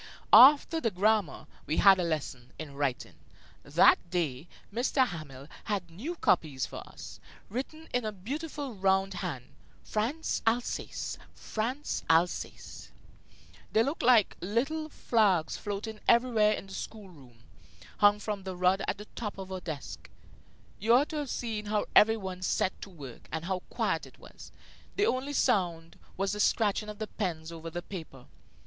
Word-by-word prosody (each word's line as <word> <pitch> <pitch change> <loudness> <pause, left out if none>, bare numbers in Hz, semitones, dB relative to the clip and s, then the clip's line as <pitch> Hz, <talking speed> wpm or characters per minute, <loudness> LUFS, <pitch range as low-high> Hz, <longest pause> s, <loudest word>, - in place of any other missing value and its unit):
After 295 +4 +8
the 230 - +2
grammar, 205 -4 +1 0.2
we 155 - 0
had 195 -2 +7
a - - +1
lesson 140 -7 -4
in 155 -3 -7
writing. 140 -3 -2 0.5
That - - +5
day 160 -4 -2 0.3
M. 240 - 0
Hamel 155 - -1 0.2
had 195 -5 -3
new 265 - -5
copies 155 - +1
for - - -9
us, - - -10 0.3
written 310 +7 -5
in 245 -1 +1
a 215 - -2
beautiful 280 - -5
round 190 0 +1
hand: 160 -10 -5 0.3
France, 250 +10 -2
Alsace, 235 +2 -1 0.2
France, 250 +7 -3
Alsace. 165 +2 0 0.8
They 220 - +4
looked 280 +7 -2
like 235 -4 +5
little 275 - -1
flags 200 - +2
floating 210 +2 -5
everywhere 230 -3 +4
in - - -5
the 195 - -11
school 205 -3 -7
room, 125 -7 -18 0.5
hung 205 0 +5
from 210 -1 -4
the 190 -1 -6
rod 180 +2 +2
at - - -1
the 210 - -9
top 210 -4 -5
of 190 -1 -7
our 185 - -3
desks. 140 - -7 0.7
You 230 +4 +4
ought 280 +4 +3
to 310 - -4
have 290 -3 -3
seen 220 -4 -3
how 210 0 0
every 220 +1 +7
one 190 -3 -6
set 185 +1 +1
to - - -8
work, 140 -9 -11
and 160 +1 -4
how 190 0 -1
quiet - - -1
it - - -18
was! - - -14 0.4
The 410 - +2
only 275 - -1
sound 175 - 0 0.2
was 195 0 0
the 210 - -5
scratching 210 0 +1
of 210 - -7
the 215 - -3
pens 170 -7 -4
over 165 0 -7
the 175 +1 -5
paper. 160 -9 -9
200 Hz, 160 wpm, -30 LUFS, 170-230 Hz, 0.8 s, After